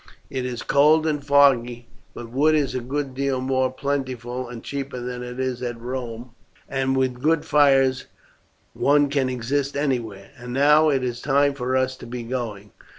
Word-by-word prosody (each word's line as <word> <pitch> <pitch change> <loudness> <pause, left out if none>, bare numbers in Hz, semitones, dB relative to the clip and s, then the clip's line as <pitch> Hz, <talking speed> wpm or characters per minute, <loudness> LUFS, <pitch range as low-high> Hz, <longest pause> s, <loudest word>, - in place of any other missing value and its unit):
It 130 -1 -2
is 120 -2 -5
cold 155 +3 +4
and 150 -2 -1
foggy; 130 -4 +3 0.3
but 115 -1 -8
wood 150 +5 +3
is 145 -3 0
a 130 - -1
good 135 +2 -4
deal 135 0 -1
more 130 0 0
plentiful 130 -3 -3
and 120 -2 -9
cheaper 140 -2 -5
than 125 0 -5
it 125 +1 -7
is 130 -1 -2
at 120 -2 -4
Rome, 120 -1 -6 0.4
and 135 0 -1
with 130 -2 -1
good 160 +1 +2
fires 135 -3 +3 0.7
one 145 0 +3
can 135 -2 0
exist 135 +3 -2
anywhere. 115 -9 -2
And 120 0 -7
now 150 +3 +5
it 135 -3 +1
is 120 -1 -3
time 140 0 +2
for 130 -1 -1
us 130 0 0
to - - -11
be 120 0 -5
going. 115 -5 -5
130 Hz, 175 wpm, -23 LUFS, 125-140 Hz, 0.7 s, now